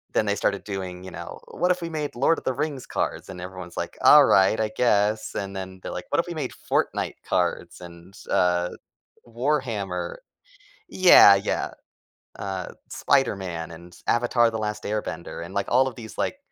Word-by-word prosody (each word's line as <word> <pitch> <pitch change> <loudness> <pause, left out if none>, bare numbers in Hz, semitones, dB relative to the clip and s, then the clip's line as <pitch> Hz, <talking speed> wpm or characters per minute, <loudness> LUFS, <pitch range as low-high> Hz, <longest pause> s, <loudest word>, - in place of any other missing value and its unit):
then 110 - +2
they 100 - +1
started 100 0 -1
doing, 95 -3 -6
you 95 - -8
know, 85 - -8
"What 180 +2 +1
if 180 0 -1
we 170 - -4
made 155 -2 -3
Lord 140 +7 +3
of - - -8
the 130 - 0
Rings 140 -2 -3
cards?" - - -3
and 90 -2 -8
everyone's 90 -1 -8
like, - - -4
"Alright, 95 +3 +7
I 110 -1 0
guess," 105 -2 +2
and 100 0 -4
then 95 -1 -7
they're - - -6
like, - - -6
"What - - +2
if - - 0
we - - -5
made - - -3 0.2
Fortnite - - 0
cards? - - -1
And, 85 +1 -12 0.2
uh, 90 -1 +2 0.6
Warhammer?" 120 - -2 0.7
Yeah, 175 - +8
yeah. 100 - -2 0.7
Uh, 95 -2 -4 0.2
Spider-Man 95 -12 0
and 85 +1 -12
Avatar: 120 0 +3
The 110 - -4
Last 105 0 -3
Airbender, 100 -6 -4
and 90 +3 -10
like 100 0 -1
all 130 +2 +4
of 130 - -4
these, 110 -1 -10
like, - - -1
100 Hz, 180 wpm, -25 LUFS, 90-120 Hz, 0.7 s, Yeah